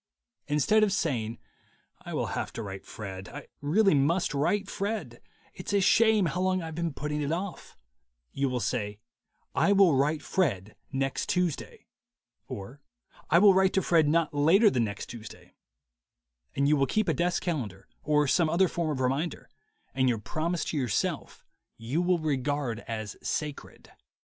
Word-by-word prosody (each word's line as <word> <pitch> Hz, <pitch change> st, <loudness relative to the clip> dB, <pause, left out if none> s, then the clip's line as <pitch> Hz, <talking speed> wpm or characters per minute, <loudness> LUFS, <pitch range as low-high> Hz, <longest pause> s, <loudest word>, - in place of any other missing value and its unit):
Instead 150 Hz, +9 st, +3 dB
of 210 Hz, -, +2 dB
saying, 120 Hz, -, -1 dB, 0.6 s
"I -, -, -6 dB
will -, -, 0 dB
have -, -, -3 dB
to 115 Hz, -, -5 dB
write 95 Hz, -1 st, -8 dB
Fred; 95 Hz, -3 st, -7 dB
I -, -, -9 dB, 0.2 s
really 195 Hz, +7 st, +3 dB
must 150 Hz, +4 st, +2 dB
write 155 Hz, +9 st, 0 dB
Fred; 210 Hz, +2 st, -4 dB, 0.3 s
it's 215 Hz, -, -6 dB
a 200 Hz, -, +4 dB
shame 220 Hz, +1 st, +4 dB
how 175 Hz, +2 st, -1 dB
long 185 Hz, 0 st, +1 dB
I've 165 Hz, -2 st, -6 dB
been 170 Hz, +1 st, -2 dB
putting 150 Hz, +1 st, -3 dB
it 145 Hz, +1 st, -1 dB
off," 180 Hz, +2 st, -5 dB, 0.5 s
you 140 Hz, 0 st, -1 dB
will 125 Hz, -1 st, -1 dB
say, 105 Hz, 0 st, -2 dB, 0.6 s
"I 200 Hz, -, +3 dB
will 195 Hz, -5 st, +5 dB
write 145 Hz, +3 st, +1 dB
Fred 110 Hz, -, -1 dB, 0.2 s
next 135 Hz, -1 st, -2 dB
Tuesday," 180 Hz, -5 st, -2 dB, 0.6 s
or 115 Hz, +9 st, -8 dB, 0.5 s
"I 165 Hz, -, +5 dB
will 200 Hz, +2 st, +7 dB
write 190 Hz, 0 st, +3 dB
to 190 Hz, -, +2 dB
Fred 165 Hz, -3 st, +3 dB
not 160 Hz, 0 st, +2 dB
later 175 Hz, +9 st, +5 dB
than 120 Hz, -3 st, +1 dB
next 100 Hz, -2 st, -6 dB
Tuesday/' 115 Hz, -3 st, -11 dB, 1.0 s
And 140 Hz, 0 st, +2 dB
you 150 Hz, -, +4 dB
will 135 Hz, -1 st, +2 dB
keep 215 Hz, +5 st, 0 dB
a 160 Hz, -, +2 dB
desk 175 Hz, +5 st, 0 dB
calendar 120 Hz, -, -4 dB
or 150 Hz, -1 st, +2 dB
some 165 Hz, +3 st, +3 dB
other 185 Hz, +4 st, +3 dB
form 170 Hz, -2 st, -2 dB
of 140 Hz, -3 st, -2 dB
reminder, 135 Hz, +6 st, -2 dB, 0.4 s
and 130 Hz, -1 st, +2 dB
your 120 Hz, -, +1 dB
promise 155 Hz, +10 st, -2 dB
to 155 Hz, -, -3 dB
yourself 125 Hz, -7 st, -2 dB, 0.3 s
you 125 Hz, +9 st, -1 dB
will 180 Hz, 0 st, +2 dB
regard 145 Hz, -5 st, -1 dB
as 110 Hz, -2 st, -5 dB
sacred. 150 Hz, -2 st, -5 dB
150 Hz, 165 wpm, -28 LUFS, 130-180 Hz, 1.0 s, will